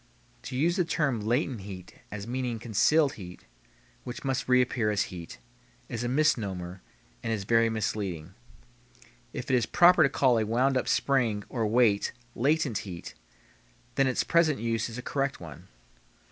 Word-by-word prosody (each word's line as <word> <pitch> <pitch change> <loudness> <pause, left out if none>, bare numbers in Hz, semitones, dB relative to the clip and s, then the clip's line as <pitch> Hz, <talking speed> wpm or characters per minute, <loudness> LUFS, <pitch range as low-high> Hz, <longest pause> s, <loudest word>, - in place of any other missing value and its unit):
To - - -7
use 170 +5 +2
the 180 - +3
term 150 -7 0
latent 120 +2 -1
heat 95 -2 -9 0.2
as 100 -1 -6
meaning 125 0 -2
concealed 135 +7 +2
heat, 90 -1 -10 0.6
which 120 -1 -7
must 135 -2 -2
reappear 125 -3 +3
as 105 -1 +1
heat, 85 -6 -8 0.5
is 115 - -4
a - - -1
misnomer 100 -11 0 0.4
and - - -3
is 105 -3 -1
very 115 +2 +3
misleading. 95 -6 -3 1.0
If - - -5
it - - +4
is 120 -3 +1
proper 175 +1 +6
to 140 - +5
call 130 -4 +3
a - - +1
wound 125 +5 +1
up 130 - 0
spring 120 -7 +1
or 115 -4 -1
weight 110 -2 +2 0.2
latent 140 -3 +1
heat 90 -4 -8 0.8
then 135 +1 +2
its 130 - +1
present 165 -3 +3
use 115 0 -1
is 115 - -8
a 125 - -6
correct 140 0 -2
one. 80 -5 -11
120 Hz, 160 wpm, -28 LUFS, 105-135 Hz, 1.0 s, proper